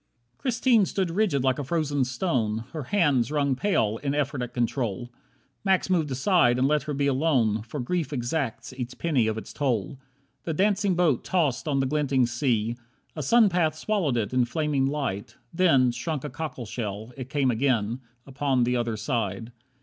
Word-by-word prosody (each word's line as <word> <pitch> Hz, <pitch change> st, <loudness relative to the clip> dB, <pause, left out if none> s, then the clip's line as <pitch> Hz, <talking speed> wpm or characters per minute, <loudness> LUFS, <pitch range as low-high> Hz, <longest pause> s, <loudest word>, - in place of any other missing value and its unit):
24 -, -, -36 dB
Christine 240 Hz, -4 st, +3 dB
stood 185 Hz, -4 st, -1 dB
rigid 175 Hz, -8 st, +1 dB
like 130 Hz, 0 st, +1 dB
a -, -, -2 dB
frozen 145 Hz, -2 st, 0 dB
stone, 120 Hz, -, -1 dB
Her 155 Hz, -5 st, -5 dB
hands 145 Hz, -, +2 dB
wrung 140 Hz, -3 st, +1 dB
pale 120 Hz, -, +1 dB
in 140 Hz, 0 st, -1 dB
effort 140 Hz, -2 st, -1 dB
at 125 Hz, -, -4 dB
control. 120 Hz, -1 st, -2 dB, 0.5 s
Max 190 Hz, -1 st, +2 dB
moved 165 Hz, -5 st, +2 dB
aside 130 Hz, -2 st, +3 dB
and 130 Hz, +1 st, +3 dB
let 150 Hz, +1 st, +2 dB
her 150 Hz, -, -4 dB
be 140 Hz, 0 st, 0 dB
alone, 130 Hz, -6 st, +2 dB
For 115 Hz, +7 st, -7 dB
grief 160 Hz, +6 st, -2 dB
exacts 130 Hz, -1 st, -3 dB
each 130 Hz, -1 st, -6 dB
penny 140 Hz, -9 st, +1 dB
of 110 Hz, 0 st, -1 dB
its 110 Hz, -, -8 dB
toll. 125 Hz, -5 st, -1 dB, 0.4 s
The 165 Hz, -, -3 dB
dancing 200 Hz, +1 st, +2 dB
boat 170 Hz, -8 st, +2 dB
tossed 155 Hz, -6 st, 0 dB
on 140 Hz, -2 st, +1 dB
the -, -, +1 dB
glinting 135 Hz, -2 st, +1 dB
sea. 120 Hz, -2 st, 0 dB, 0.4 s
A 155 Hz, -, -3 dB
sun 225 Hz, -, +5 dB
path 170 Hz, -4 st, +1 dB
swallowed 165 Hz, -, 0 dB
it 110 Hz, +1 st, -2 dB
in 125 Hz, -1 st, +3 dB
flaming 145 Hz, 0 st, 0 dB
light, 125 Hz, -6 st, -3 dB, 0.2 s
Then, 150 Hz, -8 st, +4 dB
shrunk 150 Hz, +3 st, -4 dB
a 150 Hz, -, -5 dB
cockleshell, 120 Hz, -6 st, -5 dB
it 130 Hz, -1 st, -7 dB
came 140 Hz, -3 st, +1 dB
again 120 Hz, -2 st, 0 dB, 0.3 s
Upon 135 Hz, -2 st, 0 dB
the 125 Hz, +1 st, +1 dB
other 115 Hz, -2 st, -1 dB
side. 110 Hz, -1 st, -2 dB
135 Hz, 180 wpm, -26 LUFS, 120-155 Hz, 0.5 s, sun